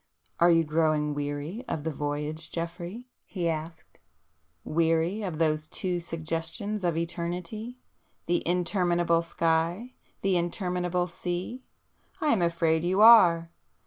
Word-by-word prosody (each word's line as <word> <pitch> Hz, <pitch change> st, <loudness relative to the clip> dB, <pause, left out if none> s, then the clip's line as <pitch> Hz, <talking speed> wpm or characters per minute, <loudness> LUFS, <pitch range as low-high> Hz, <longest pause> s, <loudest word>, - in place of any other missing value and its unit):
"Are 170 Hz, -, +6 dB
you 165 Hz, -1 st, +5 dB
growing 155 Hz, -1 st, +1 dB
weary 145 Hz, -, -4 dB
of 150 Hz, -, -3 dB
the 160 Hz, -, -2 dB
voyage 150 Hz, +2 st, -4 dB
Geoffrey?" 175 Hz, +7 st, -5 dB, 0.2 s
he 175 Hz, -4 st, -3 dB
asked—"Weary 160 Hz, -, -3 dB
of 180 Hz, -6 st, -4 dB
those 155 Hz, -1 st, +1 dB
two 180 Hz, +1 st, -2 dB
suggestions 165 Hz, +5 st, -4 dB
of 170 Hz, -2 st, 0 dB
eternity—the 175 Hz, +3 st, -5 dB
interminable 175 Hz, -1 st, +2 dB
sky, 170 Hz, +7 st, -1 dB, 0.3 s
the 195 Hz, -2 st, +2 dB
interminable 180 Hz, 0 st, -1 dB
sea? 180 Hz, +7 st, -5 dB, 0.6 s
I 305 Hz, -, +1 dB
am 220 Hz, -9 st, +3 dB
afraid 165 Hz, -1 st, +1 dB
you 185 Hz, +3 st, +1 dB
are! 170 Hz, -8 st, +7 dB
170 Hz, 115 wpm, -27 LUFS, 160-180 Hz, 0.6 s, are